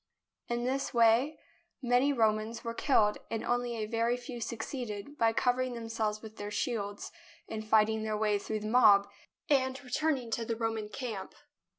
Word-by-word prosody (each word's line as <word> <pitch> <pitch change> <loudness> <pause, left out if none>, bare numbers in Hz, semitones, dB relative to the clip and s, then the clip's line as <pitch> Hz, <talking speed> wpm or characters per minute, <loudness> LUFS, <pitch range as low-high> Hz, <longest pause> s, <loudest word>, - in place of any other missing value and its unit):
In 240 0 -1
this 265 +1 -1
way 235 +6 +4 0.4
many 250 +2 +3
Romans 220 -2 +1
were 230 - -3
killed, 220 -5 +2
and 225 - -3
only 245 0 0
a 215 - -2
very 230 +2 0
few 245 -1 -8
succeeded, 230 +1 -5
by 225 -1 +4
covering 250 +2 +1
themselves 225 -2 -3
with 220 0 -10
their 205 0 -5
shields, 205 -2 -3 0.4
in 220 - -4
fighting 220 0 +3
their 215 -1 -2
way 210 -1 +1
through 215 +1 -4
the 215 - -4
mob 210 -4 +6 0.4
and 260 -2 +2
returning 260 -2 -1
to 230 - -1
the 230 0 -2
Roman 225 -2 -2
camp. 220 -5 -6
230 Hz, 165 wpm, -31 LUFS, 215-245 Hz, 0.4 s, mob